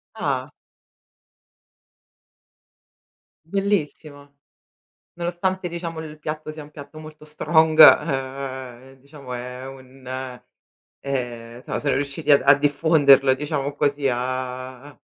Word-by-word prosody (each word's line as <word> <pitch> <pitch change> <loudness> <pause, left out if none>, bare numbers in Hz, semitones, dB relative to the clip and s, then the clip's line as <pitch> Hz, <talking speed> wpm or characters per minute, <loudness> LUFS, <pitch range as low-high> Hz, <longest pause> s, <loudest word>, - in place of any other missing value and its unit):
Ah! - - -2 2.9
Bellissimo. 155 -7 -3 0.8
Nonostante 175 +2 -2
diciamo 170 -1 -6
il 155 -1 -9
piatto 155 0 -5
sia 155 -1 -9
un 145 - -14
piatto 150 +1 -12
molto 155 0 -12
strong, 155 +1 +1
ehm, 135 -3 +3
diciamo 140 -1 -11
è 125 +1 -7
un 130 -1 -13 0.9
ehm, 120 -3 -5
so - - -4
so 140 -2 0
riusciti 145 +2 -1
ad 140 - +6
a 140 +1 +7
diffonderlo, 140 -2 +4
diciamo 145 0 -3
così, 145 -1 0
a 130 +2 -5
145 Hz, 100 wpm, -22 LUFS, 130-155 Hz, 2.9 s, a